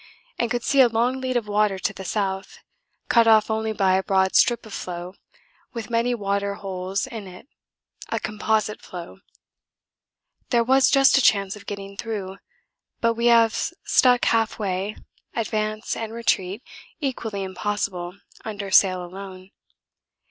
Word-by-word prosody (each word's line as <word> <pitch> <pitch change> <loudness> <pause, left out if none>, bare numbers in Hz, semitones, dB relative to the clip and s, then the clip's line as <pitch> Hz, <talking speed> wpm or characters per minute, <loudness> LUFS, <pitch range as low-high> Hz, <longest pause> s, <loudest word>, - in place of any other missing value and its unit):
and 235 - +1
could 240 +1 -2
see 275 - +4
a 255 - +7
long 240 +3 0
lead 255 -1 0
of 230 -3 -3
water 205 -1 +1
to 185 - -2
the 190 - -8
south, 190 -1 -3 0.5
cut 235 -1 +4
off 220 -1 +5
only 220 0 -1
by 195 -3 +2
a 190 - +3
broad 190 -1 +1
strip 235 -1 +4
of 215 - -11
floe 180 0 -6 0.6
with 230 -2 -6
many 235 +1 +1
water 200 -1 -1
holes 190 +2 -3
in 225 -6 -8
it: 185 +7 -13 0.6
a - - -1
composite 215 0 -1
floe. 175 +1 -9 1.3
There 235 -2 +3
was 265 +2 +4
just 275 -1 +5
a - - +3
chance 200 -4 +3
of 205 - -14
getting 200 -1 -7
through, 200 -4 -5 0.6
but 230 0 +2
we 235 +1 0
have 230 -1 +5
stuck 255 -8 +2
half 225 -1 +1
way, 195 0 -2 0.4
advance 215 -1 -2
and 225 -1 -5
retreat 220 -2 -1 0.4
equally 230 -8 -3
impossible 190 -2 -3 0.3
under 205 -3 -5
sail 185 -2 +4
alone. 185 +1 -10
210 Hz, 150 wpm, -23 LUFS, 195-230 Hz, 1.3 s, a